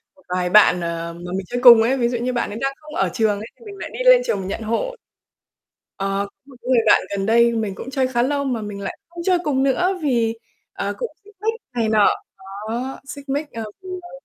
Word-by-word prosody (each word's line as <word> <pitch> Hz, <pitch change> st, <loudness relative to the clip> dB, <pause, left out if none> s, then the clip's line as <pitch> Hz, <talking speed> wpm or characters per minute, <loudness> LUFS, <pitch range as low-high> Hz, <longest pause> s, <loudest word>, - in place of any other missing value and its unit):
một 285 Hz, -, -23 dB
vài 180 Hz, 0 st, 0 dB
bạn, 180 Hz, -3 st, +6 dB
ờ, 170 Hz, 0 st, -3 dB
mà 175 Hz, +1 st, -8 dB
mình 190 Hz, -, -4 dB
chơi 245 Hz, 0 st, -3 dB
cùng 235 Hz, -3 st, +10 dB
ấy. 255 Hz, +4 st, +2 dB
Ví 240 Hz, -2 st, +1 dB
dụ 240 Hz, -, -1 dB
như 250 Hz, +2 st, -2 dB
bạn 240 Hz, -, -1 dB
ấy 215 Hz, +3 st, -6 dB
đang 270 Hz, 0 st, 0 dB
không 305 Hz, 0 st, -11 dB
ở -, -, +1 dB
trường 215 Hz, -4 st, +1 dB
ấy, 220 Hz, -, -7 dB
thì 465 Hz, -, -16 dB
mình 405 Hz, -, -9 dB
lại -, -, -6 dB
đi -, -, -7 dB
lên -, -, +7 dB
trường 470 Hz, -, 0 dB
mình 185 Hz, -, -5 dB
nhận 200 Hz, -, -4 dB
hộ. 230 Hz, -, -2 dB, 1.0 s
Ờ, 195 Hz, 0 st, -1 dB
có -, -, -64 dB
một 270 Hz, -2 st, -16 dB
cái 250 Hz, -, -8 dB
người 250 Hz, -, +5 dB
bạn -, -, +6 dB, 0.2 s
gần 195 Hz, 0 st, -2 dB
đây 235 Hz, +1 st, +4 dB
mình 215 Hz, -4 st, -2 dB
cũng 265 Hz, -, -8 dB
chơi 265 Hz, -1 st, +1 dB
khá 240 Hz, -2 st, +1 dB
lâu 280 Hz, +2 st, 0 dB
mà 245 Hz, -5 st, -2 dB
mình 205 Hz, -1 st, -6 dB
lại -, -, -5 dB
không 340 Hz, 0 st, -8 dB
chơi 365 Hz, -2 st, +3 dB
cùng 270 Hz, -3 st, +1 dB
nữa 360 Hz, +8 st, +1 dB
vì, 235 Hz, -5 st, +1 dB, 0.4 s
ờ, -, -, -3 dB
cũng 485 Hz, -2 st, -3 dB
xích 415 Hz, 0 st, -18 dB
mích 450 Hz, +1 st, +1 dB, 0.2 s
này 230 Hz, -2 st, 0 dB
nọ. 215 Hz, -2 st, +5 dB, 0.6 s
Đó, 250 Hz, +4 st, -4 dB
xích 280 Hz, -1 st, -9 dB
mích, 290 Hz, +2 st, -2 dB
ờ, 225 Hz, -, -5 dB, 0.2 s
vì 370 Hz, -, -9 dB
bạn 350 Hz, -, -13 dB
240 Hz, 255 wpm, -21 LUFS, 215-285 Hz, 1.0 s, cùng